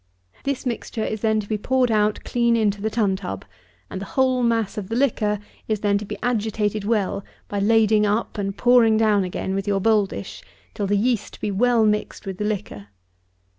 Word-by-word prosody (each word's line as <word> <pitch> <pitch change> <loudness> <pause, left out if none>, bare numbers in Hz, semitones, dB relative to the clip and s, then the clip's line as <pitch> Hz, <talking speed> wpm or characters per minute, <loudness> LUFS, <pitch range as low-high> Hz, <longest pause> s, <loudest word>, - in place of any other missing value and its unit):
This 275 -1 -2
mixture 230 -2 -3
is 215 -1 -3
then 220 -1 +2
to 200 - -11
be 215 -1 -2
poured 255 +1 +1
out 210 -1 +1
clean 235 -1 +2
into 205 -2 +1
the 220 - 0
tun 210 -4 +1
tub, 180 - -6 0.4
and 190 - -6
the - - -5
whole 260 -1 +3
mass 230 -3 +1
of 200 -3 -5
the 225 - -2
liquor 220 -5 +1 0.3
is 215 -2 -1
then 200 -1 +2
to 210 - -6
be - - -6
agitated 215 -3 0
well 205 -3 0 0.2
by 205 - -3
lading 215 0 +4
up 210 +1 -1
and 195 0 -3
pouring 240 -3 +5
down 215 -3 +3
again 185 +1 -3
with 195 0 -2
your 200 -1 +1
bowl 210 0 +3
dish, - - -8 0.3
till 205 -3 -2
the 205 +1 +2
yeast 235 +1 -1
be 210 - -2
well 230 +2 +3
mixed 210 0 -1
with 190 -1 -6
the 210 - -1
liquor. 200 - -4
215 Hz, 205 wpm, -23 LUFS, 200-230 Hz, 0.4 s, pouring